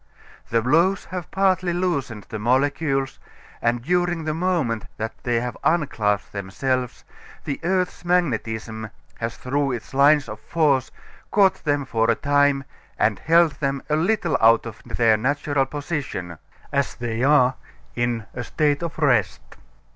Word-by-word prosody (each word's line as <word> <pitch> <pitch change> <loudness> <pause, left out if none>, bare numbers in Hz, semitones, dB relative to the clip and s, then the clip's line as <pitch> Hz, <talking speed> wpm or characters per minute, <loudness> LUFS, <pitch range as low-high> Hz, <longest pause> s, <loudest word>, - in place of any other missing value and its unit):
The 115 -1 +1
blows 170 +9 +2
have 180 -3 -5
partly 185 -2 +1
loosened 140 - -2
the 110 - -5
molecules 135 +3 0 0.4
and 115 0 0
during 175 +1 0
the 155 0 -1
moment 160 - -1
that 110 +1 -3
they 120 -1 0 0.3
unclasped 115 - 0
themselves 125 +6 -2 0.4
the 140 - -4
earth's 180 +1 -1
magnetism 110 -10 -1 0.3
has 115 0 -4
through 140 +1 -1
its 120 +1 -7
lines 145 +1 +5
of 105 -1 -7
force 140 0 +1 0.4
caught 195 -2 +3
them 145 -2 +1
for 115 -3 +1
a 115 - +4
time 145 0 +2 0.3
and 105 -1 +1
held 165 0 +4
them 140 -2 -1
a - - +4
little 170 -3 +1
out 115 +1 +5
of 115 - -8
their 115 -2 +2
natural 140 +3 0
position 140 - -5 0.3
as 140 -1 0
they 120 -1 -3
are 130 -2 +4 0.4
in 120 -2 -1
a 120 - -4
state 145 +4 0
of 170 -2 -4
rest. 125 - +1
140 Hz, 140 wpm, -23 LUFS, 115-160 Hz, 0.4 s, lines